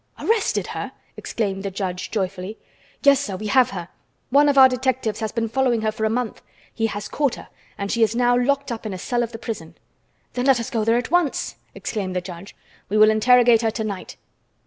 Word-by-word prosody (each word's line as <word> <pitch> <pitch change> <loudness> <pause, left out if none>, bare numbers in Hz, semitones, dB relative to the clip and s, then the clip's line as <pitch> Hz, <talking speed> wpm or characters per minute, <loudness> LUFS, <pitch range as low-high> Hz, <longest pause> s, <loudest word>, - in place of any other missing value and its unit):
"Arrested 450 -1 0
her?" - - -5 0.2
exclaimed 195 -4 -3
the 195 - -3
judge 185 -2 -4
joyfully. 190 0 -3 0.5
"Yes, 280 -1 +6
sir, 210 -9 -3
we 210 +3 -6
have 250 +3 +4
her. 175 -3 -6 0.4
One 290 +2 +5
of 280 - +1
our 265 -1 +10
detectives 255 -3 -1
has 220 -2 -2
been 230 -1 -1
following 245 -1 +1
her 215 0 0
for 220 0 -2
a - - +2
month. 235 0 -2 0.3
He 225 - 0
has 205 -1 -5
caught 285 -4 0
her, - - -12 0.3
and 200 -1 -3
she 235 - 0
is 225 0 +3
now 245 0 +3
locked 280 +2 +1
up 225 -1 -5
in 200 - -4
a - - -5
cell 240 +6 -1
of 235 -1 -2
the 225 - -7
prison." 220 -8 -7 0.6
"Then 250 +2 -1
let 265 -3 +5
us 230 - -5
go 225 -2 0
there 225 +2 +3
at 245 - -3
once!" 345 -5 +1 0.2
exclaimed 190 -4 -4
the - - +2
judge. 180 +1 -10 0.3
"We 210 - +1
will 215 0 +7
interrogate 240 +1 +5
her 225 - +2
to 220 0 -3
night. 200 -3 -6
225 Hz, 220 wpm, -22 LUFS, 205-250 Hz, 0.6 s, our